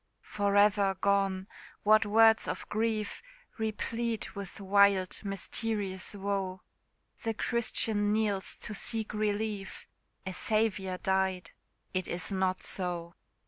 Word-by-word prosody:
For 205 -1 -1
ever 205 -1 +4
gone! 195 -1 +1 0.4
what 215 0 +5
words 225 +1 +5
of - - -4
grief 215 -1 -1 0.4
Replete 225 +1 -2
with 200 +1 -7
wild 200 -1 +3
mysterious 200 0 -2
woe! 195 -2 -2 0.6
The 225 -2 -2
Christian 220 -3 0
kneels 210 -3 0
to 210 - -5
seek 220 +1 -2
relief 210 -2 -2 0.4
A 190 - -4
Saviour 200 -3 0
died 190 -3 0 0.4
It 185 -1 -1
is 175 +3 -2
not 190 -1 0
so. 175 -2 -1
200 Hz, 110 wpm, -30 LUFS, 190-215 Hz, 0.6 s, what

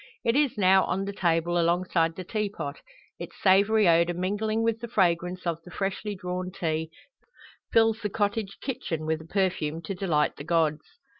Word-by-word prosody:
It 230 - +2
is 285 -5 +2
now 190 -1 +5
on 195 +2 -1
the 200 - -4
table, 175 -2 +1
alongside 170 -1 +1
the 185 - -6
teapot; 190 -8 -3 0.4
its - - -8
savoury 200 +2 +4
odour 170 +1 +4
mingling 210 +5 -1
with 230 -1 0
the 235 - -6
fragrance 180 -4 0
of 165 -1 -2
the 180 - -14
freshly 200 +3 -3
"drawn" 180 -1 -4
tea, 160 -2 -2 0.8
fills 225 -1 +4
the 210 - -2
cottage 205 0 -2
kitchen 240 - -4
with 160 0 -1
a - - -12
perfume 175 -5 -1
to 180 - -4
delight 170 -6 0
the - - -7
gods. 155 -1 0
185 Hz, 170 wpm, -27 LUFS, 165-205 Hz, 0.8 s, now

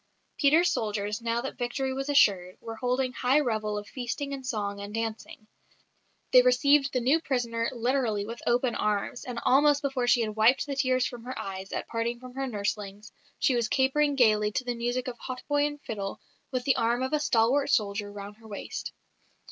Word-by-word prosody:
Peter's 320 +5 +4
soldiers, 210 0 -2
now 230 0 -1
that 270 +1 -6
victory 260 +2 -2
was 270 +2 -4
assured, 190 -10 +3
were 225 -1 -8
holding 250 +1 0
high 255 +4 +3
revel 215 -6 -1
of 205 0 -6
feasting 275 +3 -4
and 270 -1 -6
song 205 -5 -3
and 205 +1 -7
dancing. 225 -1 -5 0.9
They 250 - +8
received 275 +3 +4
the 255 - 0
new 265 +7 +3
prisoner 235 -5 -1
literally 240 -4 0
with 230 +2 -7
open 240 0 +2
arms, 210 +3 -1
and 245 -2 -4
almost 290 +2 +4
before 265 -3 -1
she 240 - +4
had 215 -2 -2
wiped 225 +5 +4
the 280 -1 -4
tears 255 -1 +2
from 240 -2 -6
her 255 - -5
eyes, 190 0 -6
at - - -4
parting 235 +1 -2
from 255 0 -11
her 270 +1 -3
nurslings, 205 -2 -4 0.3
she 265 - +2
was 235 -2 +1
capering 280 +4 +2
gaily 215 -4 +3
to 255 - -1
the 245 -1 -2
music 245 +2 -2
of 240 -2 -6
hautboy 290 +3 -1
and 295 0 -7
fiddle, 200 -3 -5 0.3
with 255 -2 -2
the 270 +1 +2
arm 235 +1 +1
of 260 - -3
a 300 - +3
stalwart 270 0 +2
soldier 205 -4 0
round 205 0 -9
her 225 0 -15
waist. 205 -2 -6
245 Hz, 195 wpm, -28 LUFS, 215-265 Hz, 0.9 s, They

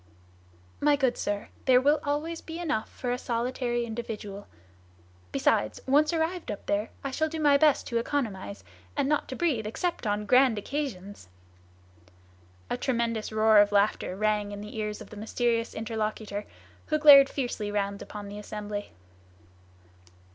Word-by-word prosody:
"My 295 0 +4
good 265 -3 +1
sir, 205 0 -3 0.2
there 255 -1 +6
will 290 +3 +3
always 310 +3 -2
be 325 0 -7
enough 295 -11 -2
for 245 - -4
a 250 - -1
solitary 240 0 -1
individual; 220 -3 -6 0.8
besides, 110 - +1
once 295 +4 +4
arrived 335 +1 -1
up 205 - -5
there, 205 +2 0
I 275 - -3
shall 315 +4 0
do 320 0 -5
my 290 -2 +5
best 300 -1 +3
to 235 - -1
economize, 195 - -3 0.3
and - - +1
not 300 0 +1
to 260 - -5
breathe 260 -11 0
except 295 +2 -2
on 210 0 -1
grand 250 +1 +5
occasions!" 205 - -5 1.4
A - - -2
tremendous 235 -4 -1
roar 220 0 +5
of 205 0 +5
laughter 200 -2 +1
rang 210 0 0
in 205 0 -6
the 210 +1 -9
ears 210 -1 -3
of - - -11
the 210 - -9
mysterious 230 +2 -1
interlocutor, 215 -2 -3 0.4
who 305 - +1
glared 285 -3 +9
fiercely 240 -6 -3
round 200 -1 -2
upon 205 -1 -8
the 205 +1 -7
assembly. 210 0 -6
230 Hz, 155 wpm, -28 LUFS, 210-280 Hz, 1.4 s, glared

